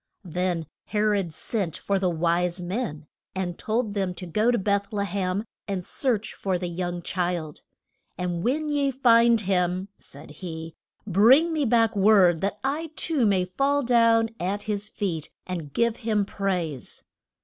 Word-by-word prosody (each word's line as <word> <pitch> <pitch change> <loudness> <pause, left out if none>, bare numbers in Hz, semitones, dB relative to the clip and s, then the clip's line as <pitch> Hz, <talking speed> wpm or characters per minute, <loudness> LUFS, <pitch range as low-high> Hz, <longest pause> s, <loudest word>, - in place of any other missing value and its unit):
Then 175 -1 -1 0.2
He 210 - -2
rod 205 -5 +1
sent 185 0 -3
for 200 -1 -1
the 185 -1 +1
wise 175 +2 +1
men, 180 -4 -4 0.3
and 180 -2 -2
told 220 -1 -1
them 190 -3 -1
to 180 - -7
go 215 +7 +1
to 245 - +3
Beth 200 0 0
le 205 -2 -1
hem, 195 +1 -2 0.2
and 190 -3 -3
search 230 -6 -1
for 190 -2 -1
the 175 0 -4
young 175 0 -4
child. 175 -4 -2 0.6
And 175 -1 -2
when 300 +5 0
ye 285 -1 +1
find 235 -3 +4
him, 185 0 0
said 145 +2 -13
he, 160 -2 -6 0.3
bring 245 - +5
me 305 -3 +1
back 225 -2 +3
word 195 -5 +5
that 200 +1 -1
I 300 +5 -1
too 290 -9 +2
may 190 -3 +2
fall 275 +9 +1
down 230 -2 +4
at 195 +4 -2
his 210 -1 -2
feet 165 -7 -3 0.2
and 170 -6 -5
give 235 +7 +1
him 215 -4 0
praise. 180 -9 -3
195 Hz, 160 wpm, -25 LUFS, 175-225 Hz, 0.6 s, bring